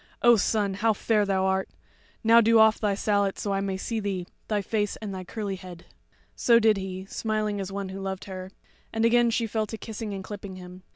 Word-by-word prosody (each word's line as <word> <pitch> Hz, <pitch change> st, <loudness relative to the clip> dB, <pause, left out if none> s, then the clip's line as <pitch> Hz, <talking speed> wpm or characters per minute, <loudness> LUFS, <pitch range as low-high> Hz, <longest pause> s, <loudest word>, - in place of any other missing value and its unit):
O 240 Hz, 0 st, +8 dB
son, 205 Hz, -1 st, +1 dB
how 220 Hz, +3 st, +2 dB
fair 210 Hz, 0 st, +1 dB
thou 190 Hz, -1 st, +1 dB
art! 190 Hz, 0 st, 0 dB, 0.5 s
Now 230 Hz, +1 st, +7 dB
do 230 Hz, +1 st, +5 dB
off 220 Hz, 0 st, +6 dB
thy 205 Hz, -2 st, +1 dB
sallet 200 Hz, -1 st, +1 dB
that 205 Hz, -, -4 dB
I 195 Hz, 0 st, 0 dB
may 195 Hz, -1 st, -2 dB
see 225 Hz, +3 st, -3 dB
thee, 195 Hz, -4 st, -3 dB, 0.2 s
thy 210 Hz, -2 st, 0 dB
face 210 Hz, 0 st, -1 dB
and 210 Hz, -3 st, -6 dB
thy 185 Hz, -1 st, -5 dB
curly 200 Hz, 0 st, -4 dB
head." 180 Hz, -2 st, -11 dB, 0.5 s
So 235 Hz, -1 st, +5 dB
did 220 Hz, -2 st, +4 dB
he, 190 Hz, -1 st, -5 dB
smiling 215 Hz, 0 st, -2 dB
as 195 Hz, 0 st, -5 dB
one 195 Hz, -1 st, -4 dB
who 195 Hz, +1 st, -6 dB
loved 190 Hz, -1 st, -4 dB
her, 185 Hz, -1 st, -7 dB, 0.4 s
and 225 Hz, 0 st, +1 dB
again 240 Hz, 0 st, +4 dB
she 230 Hz, 0 st, 0 dB
fell 220 Hz, -1 st, -1 dB
to 225 Hz, -, -6 dB
kissing 220 Hz, 0 st, -6 dB
and 195 Hz, -1 st, -5 dB
clipping 200 Hz, -1 st, -7 dB
him. 180 Hz, 0 st, -11 dB
205 Hz, 220 wpm, -26 LUFS, 190-220 Hz, 0.5 s, O